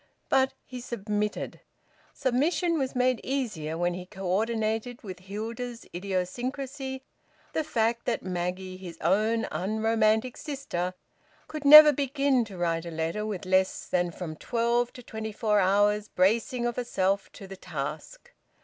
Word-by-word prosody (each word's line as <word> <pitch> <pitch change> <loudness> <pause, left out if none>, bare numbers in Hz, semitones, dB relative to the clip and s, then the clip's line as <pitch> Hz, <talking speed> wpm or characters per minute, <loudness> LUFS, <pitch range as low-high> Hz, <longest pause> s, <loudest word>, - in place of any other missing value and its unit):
But 265 0 +3
he 250 -1 -8
submitted. 210 -3 -3 0.5
Submission 315 +6 +1
was 265 -1 -2
made 250 -1 +2
easier 210 - -2
when 175 +1 +1
he 180 0 -7
co 195 -1 -8
ordinated 220 +4 -1
with 185 -4 -7
Hilda's 230 +5 -6
idiosyncrasy 255 +9 -3 0.5
the 315 - 0
fact 235 -5 0
that - - -1
Maggie, 185 +1 -3
his 175 -3 -9
own 220 +3 +2
unromantic 220 +3 +1
sister, 185 - -4 0.5
could 305 -2 -6
never 300 +1 +11
begin 275 -2 +1
to 200 -3 -10
write 170 -1 -1
a - - -4
letter 165 +6 -2
with 200 -3 -4
less 185 0 +1
than 175 -1 0
from 165 -2 -6
twelve 235 +3 0
to 250 - -11
twenty 220 -1 -5
four 210 -1 +1
hours' 205 +2 +3
bracing 230 +6 +1
of 240 -1 -2
herself 195 -5 0
to 195 - -10
the 195 0 -9
task. - - -6
220 Hz, 140 wpm, -28 LUFS, 185-250 Hz, 0.5 s, never